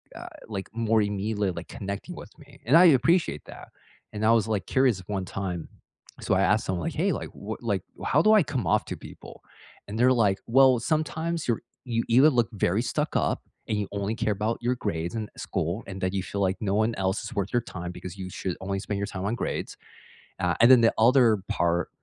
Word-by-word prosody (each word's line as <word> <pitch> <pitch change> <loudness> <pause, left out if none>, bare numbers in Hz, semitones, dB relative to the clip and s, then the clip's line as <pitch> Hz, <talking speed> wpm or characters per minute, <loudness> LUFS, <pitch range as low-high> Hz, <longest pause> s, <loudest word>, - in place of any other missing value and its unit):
uh, - - -8 0.2
like, 100 -3 -5
more 115 -1 +2
immediately, 105 0 -1
like, 85 0 -7
connecting 100 - -6
with - - -10
me, 140 -2 -17
and 130 +7 +4
I 180 - +8
appreciate 165 +3 +3
that, - - -12 0.4
and, 105 0 -4
I 110 - +5
was, 115 -2 +3
like, 105 -3 -1
curious 130 -6 +2
one 95 -3 -3
time, 90 -2 -5 0.5
so - - +1
I 95 - +2
asked 105 +3 +2
someone 90 -3 -2
like, - - -3
"Hey," - - +1
like, - - -5
"what - - -7
like, - - -1 0.2
how 150 - +3
do 215 +5 +5
I 210 -4 +6
come 130 - -3
off - - +2
to - - -6
people?" - - -12 0.5
and, 105 - -5
they're 130 +2 +5
like, 105 -5 +2
"Well, 130 +1 +5
sometimes 160 +4 -2
you're 120 -3 0 0.2
you 115 -2 -1
either 130 +6 +6
look 120 -5 +1
very 100 +1 +1
stuck 150 +5 -2
up - - +1 0.3
and 105 - -1
you 105 -1 -2
only 100 +1 -2
care 110 - 0
about 105 +3 -1
your 125 +1 0
grades 85 -6 -3
and 110 -2 -4
school, 90 +8 -3
and 95 0 -7
that 95 0 -1
you 95 - 0
feel 100 +1 -4
like 95 0 +1
no 100 -2 0
one 110 +2 +2
else 95 +1 -1
is - - -7
worth 100 -2 -2
your 120 - +3
time, 90 -6 -7
because 90 +1 -9
you 95 -1 -6
should 90 -1 -4
only 95 +1 -2
spend 100 +1 -4
your 100 - -2
time 95 0 -5
on 105 - 0
grades." - - -4 0.6
Uh, 90 0 +1
and 120 - +7
then 125 -2 +8
the 115 - +4
other 115 -2 +5
part 85 0 0
110 Hz, 225 wpm, -26 LUFS, 95-125 Hz, 0.6 s, I